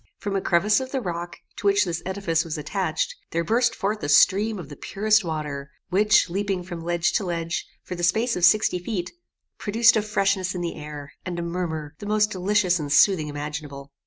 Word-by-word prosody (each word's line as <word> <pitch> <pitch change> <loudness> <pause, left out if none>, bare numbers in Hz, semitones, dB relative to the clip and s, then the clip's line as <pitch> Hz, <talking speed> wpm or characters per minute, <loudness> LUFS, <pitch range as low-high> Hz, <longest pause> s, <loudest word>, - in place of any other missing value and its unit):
From 200 -1 -4
a 195 - +1
crevice 190 +7 +3
of 260 -1 -5
the 270 - -1
rock, 175 -5 -5 0.2
to 210 - -1
which 200 +1 +4
this 170 -2 -3
edifice 185 -4 0
was 165 -3 -5
attached, 155 +2 -2 0.2
there 170 +1 -1
burst 235 +5 +2
forth 210 +2 -2
a 145 - -3
stream 200 +8 +4
of 180 - -7
the 145 - -10
purest 215 +6 +1
water, 150 -4 -4 0.2
which, 210 +2 +4
leaping 195 0 -2
from 175 -2 -7
ledge 170 0 0
to - - +1
ledge, 170 -2 -3 0.2
for - - -6
the 175 - -5
space 220 +8 +2
of 180 - -4
sixty 185 0 +4
feet, 180 -1 -4 0.5
produced 225 +2 +4
a 220 - +3
freshness 195 -3 0
in 180 - -3
the 170 -1 -2
air, 150 -2 -8
and 175 -1 -5
a 170 - -2
murmur, 170 -4 -4
the 205 - -7
most 210 0 +2
delicious 185 -1 +1
and 145 -2 -4
soothing 160 0 +4
imaginable. 145 -1 -6
180 Hz, 205 wpm, -24 LUFS, 165-205 Hz, 0.5 s, which